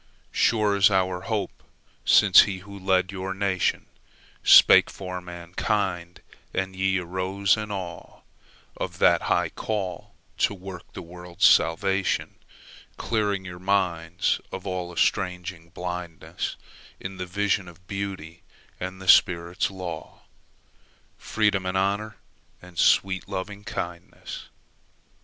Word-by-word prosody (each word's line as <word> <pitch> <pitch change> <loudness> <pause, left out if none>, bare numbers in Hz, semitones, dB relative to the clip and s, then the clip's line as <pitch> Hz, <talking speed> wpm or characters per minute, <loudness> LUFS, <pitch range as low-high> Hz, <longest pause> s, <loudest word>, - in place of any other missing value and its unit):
Sure 105 -3 +2
is 100 0 +5
our 95 -2 +1
hope 110 -3 -3 0.4
since - - +7
he 100 -2 -1
who 100 -1 -10
led 95 0 +1
your 95 0 -4
nationSpake 95 -2 +3
for 90 -1 -6
mankind, 90 +1 -3 0.3
and 95 0 -2
ye 95 0 +1
arose 95 +2 0
in 105 -1 -5
aweOf 95 -4 -9
that - - +4
high - - +1
call 95 -5 -4 0.2
to 100 - +2
work 95 -2 -10
the - - -7
world's 90 0 -2
salvation; 95 +4 +2 0.6
Clearing 105 -4 -1
your 90 -1 -8
minds 90 -3 0
of 95 - -7
all 90 -2 -3
estranging 90 -1 -1
blindnessIn 90 -1 -5 0.6
the 90 - -4
vision 100 +1 0
of 90 +1 -15
Beauty 95 -4 -6 0.4
and 95 +1 -5
the 95 - -10
Spirit's 85 0 +4
law, 90 -5 -7 1.0
Freedom 105 -3 +1
and 95 +1 -1
Honour 100 +3 -1 0.4
and 90 -2 -11
sweet 95 -1 +3
Lovingkindness. 95 -3 -6
95 Hz, 110 wpm, -25 LUFS, 90-100 Hz, 1.0 s, since